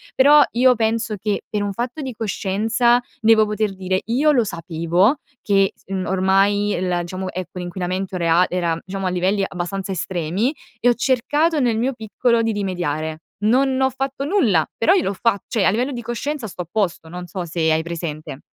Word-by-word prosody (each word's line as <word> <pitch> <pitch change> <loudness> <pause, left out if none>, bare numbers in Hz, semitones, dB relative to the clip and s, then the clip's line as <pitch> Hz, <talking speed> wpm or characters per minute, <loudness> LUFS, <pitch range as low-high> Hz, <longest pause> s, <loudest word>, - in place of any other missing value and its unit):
Però 290 +3 +7
io 250 +2 +4
penso 225 -1 0
che 205 +1 -2
per 210 -1 -1
un 200 -1 -2
fatto 245 +7 -4
di 265 -3 -5
coscienza 225 +3 +1 0.2
devo 220 -1 +5
poter 210 -1 -2
dire: 185 0 -1
"Io 275 +7 +3
lo 245 -5 +3
sapevo, 170 - +1 0.2
che, 195 -1 +2 0.2
mhmm, 190 -1 -3
ormai 195 +2 +2
la 180 -1 0
diciamo, 185 +2 -5
ecco, 185 0 -6
l'inquinamento 185 +1 -3
rea 170 +1 +3
era 170 -2 0
diciamo 195 0 -5
a - - +1
livelli 185 +3 +1
abbastanza 190 +2 -4
estremi 185 - -1 0.3
e 245 - +3
ho 240 - +5
cercato 290 +6 +1
nel 240 -4 +1
mio 255 +4 0
piccolo 230 +1 0
di 225 0 0
rimediare." 160 -6 -3 0.2
Non 260 +5 +2
ho 265 - +3
fatto 270 +1 -3
nulla, 240 - +2
però 345 +11 +4
io 370 - +3
l'ho 195 - -1
fat 200 0 0
cioè 225 -5 0
a - - +5
livello 245 +7 0
di 245 -3 -5
coscienza 240 +3 -4
sto 180 -2 -6
a 170 - -19
posto, 180 -6 -1
non 180 +2 -7
so 175 +1 -5
se 160 -1 0
hai 160 0 +1
presente. 155 -4 -6
200 Hz, 190 wpm, -21 LUFS, 180-240 Hz, 0.3 s, Però